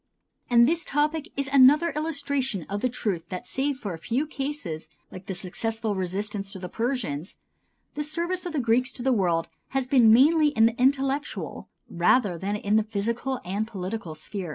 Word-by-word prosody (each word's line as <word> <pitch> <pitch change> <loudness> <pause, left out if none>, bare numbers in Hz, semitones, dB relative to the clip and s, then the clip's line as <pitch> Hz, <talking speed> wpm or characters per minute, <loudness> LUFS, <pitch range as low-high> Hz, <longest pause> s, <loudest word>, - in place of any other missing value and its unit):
And 235 -1 +6
this 335 +2 +1
topic 300 +3 -1
is 275 -1 0
another 280 +5 +6
illustration 285 - -2
of 200 +1 -3
the 255 - +1
truth 195 -8 -3
that 185 +5 -5
save 275 +1 -1
for 205 -8 -5
a 165 - -8
few 245 - -1
cases 270 - -5 0.2
like 185 0 -10
the 190 - -3
successful 220 +4 -3
resistance 195 +2 -3
to - - -6
the 180 -1 -6
Persians, 220 - -3 0.6
the 300 - -3
service 345 +4 -2
of 345 - -5
the 300 - 0
Greeks 250 +2 +2
to 245 - -6
the 265 0 +3
world 175 -6 +1 0.3
has 265 - +1
been 250 -4 +5
mainly 300 +6 +6
in 250 -7 +4
the 230 +2 0
intellectual 275 +2 0 0.2
rather 180 +3 +2
than 200 +3 -2
in 210 +1 +1
the 220 - +3
physical 230 +5 -2
and 200 +4 -2
political 190 -5 -5
sphere. 185 +2 -6
235 Hz, 180 wpm, -26 LUFS, 195-280 Hz, 0.6 s, And